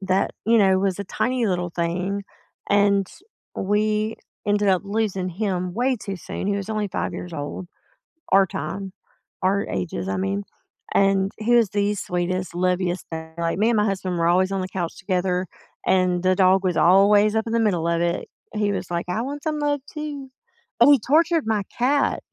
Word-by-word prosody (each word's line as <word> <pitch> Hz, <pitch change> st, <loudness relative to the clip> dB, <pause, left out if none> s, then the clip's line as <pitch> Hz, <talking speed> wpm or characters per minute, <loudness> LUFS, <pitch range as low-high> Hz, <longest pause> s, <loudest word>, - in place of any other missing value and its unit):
that, 190 Hz, 0 st, +1 dB, 0.2 s
you 230 Hz, 0 st, +5 dB
know, 190 Hz, -3 st, +4 dB
was 195 Hz, -1 st, 0 dB
a 200 Hz, -, -3 dB
tiny 245 Hz, +5 st, -1 dB
little 180 Hz, -2 st, -1 dB
thing, 180 Hz, +4 st, -2 dB, 0.5 s
and 200 Hz, -1 st, +3 dB, 0.5 s
we 215 Hz, +2 st, 0 dB, 0.3 s
ended 205 Hz, 0 st, +2 dB
up 185 Hz, -2 st, +3 dB
losing 200 Hz, -3 st, -1 dB
him 185 Hz, -1 st, -2 dB
way 250 Hz, +2 st, +1 dB
too 200 Hz, -2 st, -6 dB
soon. 185 Hz, -, -6 dB
He 200 Hz, 0 st, +1 dB
was 200 Hz, +2 st, -5 dB
only 215 Hz, -1 st, -1 dB
5 190 Hz, -, -3 dB
years 175 Hz, -2 st, -7 dB
old, 145 Hz, +5 st, -5 dB, 0.7 s
our 195 Hz, 0 st, +6 dB
time, 185 Hz, +5 st, -5 dB, 0.5 s
our 200 Hz, +2 st, +1 dB
ages, 95 Hz, 0 st, -3 dB
I 95 Hz, 0 st, -1 dB
mean. 95 Hz, +2 st, -1 dB, 0.5 s
And 195 Hz, 0 st, +3 dB
he 240 Hz, +2 st, +3 dB
was 230 Hz, -4 st, +4 dB
the 205 Hz, 0 st, +1 dB
sweetest, 180 Hz, -1 st, -2 dB
loviest 180 Hz, 0 st, 0 dB
thing. 160 Hz, 0 st, -7 dB
Like, 165 Hz, 0 st, -1 dB
me 220 Hz, +4 st, +3 dB
and 225 Hz, -, +2 dB
my 210 Hz, -, +3 dB
husband 185 Hz, -3 st, -2 dB
were 170 Hz, -, +2 dB
always 185 Hz, +2 st, +3 dB
on 195 Hz, -1 st, -1 dB
the 185 Hz, -, -3 dB
couch 175 Hz, -3 st, -4 dB
together, 185 Hz, -1 st, -1 dB, 0.4 s
and 185 Hz, -1 st, +2 dB
the 185 Hz, 0 st, +3 dB
dog 190 Hz, 0 st, +4 dB
was 185 Hz, -2 st, 0 dB
always 205 Hz, +4 st, +5 dB
up 220 Hz, +1 st, 0 dB
in 225 Hz, -, -2 dB
the 230 Hz, -, +2 dB
middle 180 Hz, -7 st, +1 dB
of 170 Hz, 0 st, +1 dB
it. 170 Hz, +1 st, -1 dB, 0.3 s
He 210 Hz, -1 st, 0 dB
was 195 Hz, -, -4 dB
like, 170 Hz, 0 st, -1 dB
"I 215 Hz, +5 st, -1 dB
want 285 Hz, +2 st, -5 dB
some 310 Hz, -1 st, -2 dB
love 290 Hz, -1 st, 0 dB
too." 290 Hz, -3 st, -6 dB, 0.5 s
Oh, 290 Hz, -, +7 dB
he 280 Hz, -, +6 dB
tortured 320 Hz, +5 st, +2 dB
my 215 Hz, -2 st, +1 dB, 0.2 s
cat. 275 Hz, +4 st, +2 dB
195 Hz, 190 wpm, -23 LUFS, 180-215 Hz, 0.7 s, Oh